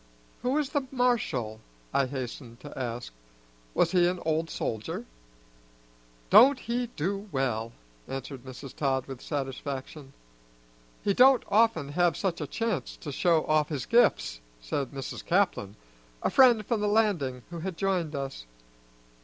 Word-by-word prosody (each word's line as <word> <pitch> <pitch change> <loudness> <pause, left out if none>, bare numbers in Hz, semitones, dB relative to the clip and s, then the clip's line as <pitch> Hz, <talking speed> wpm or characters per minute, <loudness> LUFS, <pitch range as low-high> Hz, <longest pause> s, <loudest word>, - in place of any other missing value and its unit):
"Who 250 +2 0
was 295 -2 +1
the 285 -3 -1
marshal?" 225 - 0 0.3
I 135 - +3
hastened 125 -2 -6
to 145 - -10
ask. 120 - -4 0.6
"Was 165 - +3
he 175 -2 +4
an 180 0 -1
old 160 +1 0
soldier?" 110 -1 -3 1.3
"Don't 270 +3 +8
he 240 +1 -1
do 195 +6 -2
well?" 115 -4 -1 0.4
answered 135 -1 -6
Mrs. 130 +1 -9
Todd 135 -3 0
with 135 -2 -8
satisfaction. 135 0 -5 0.9
"He 200 - +2
don't 255 +2 +6
often 205 -9 +3
have 175 +3 +2
such 180 -5 -1
a 150 - -3
chance 220 - -2
to 145 - -7
show 165 +3 +2
off 155 -1 +2
his 140 -6 -3
gifts," - - +3 0.2
said 95 - -3
Mrs. 135 -2 -6
Caplin, 170 - +1 0.5
a - - +1
friend 240 -5 +6
from 225 -1 0
the 210 - +1
Landing 185 - +1
who 170 - -5
had 180 0 -4
joined 180 -6 0
us. 135 - -5
155 Hz, 145 wpm, -28 LUFS, 130-205 Hz, 1.3 s, Don't